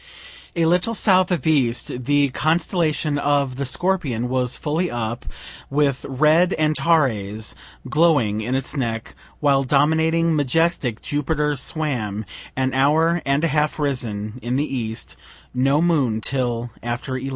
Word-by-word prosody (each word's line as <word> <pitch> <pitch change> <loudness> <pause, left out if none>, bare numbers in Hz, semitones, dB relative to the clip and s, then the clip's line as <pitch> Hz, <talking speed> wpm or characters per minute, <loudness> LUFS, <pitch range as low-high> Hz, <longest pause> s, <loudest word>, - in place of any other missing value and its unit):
A 165 -1 +2
little 180 +7 +2
south 185 -3 +4
of 180 -2 -1
east 125 -4 0
the 145 0 +3
constellation 155 0 0
of 140 -3 0
the 140 - -2
Scorpion 135 -6 0
was 125 -1 0
fully 165 +4 -1
up, 120 0 -4 0.4
with 140 -2 0
red 155 +7 +3
Antares 135 -9 +1 0.3
glowing 145 -10 +2
in 125 +4 -2
its 135 +3 -3
neck; 115 -5 -3 0.3
while 140 -2 +3
dominating, 160 +4 +2
majestic 145 -4 0
Jupiter 150 0 -1
swam, 125 -8 -2 0.3
an 130 0 0
hour 160 +5 +3
and 140 +3 +1
a - - +4
half 150 0 0
risen, 120 -6 -3
in 120 +2 -2
the 145 +3 +1
east 110 -2 -4 0.4
(no 135 +5 +2
moon 140 -10 +1
till 120 -1 -2
after 120 +3 -4
11.) 130 +1 -4
140 Hz, 135 wpm, -21 LUFS, 125-160 Hz, 0.4 s, south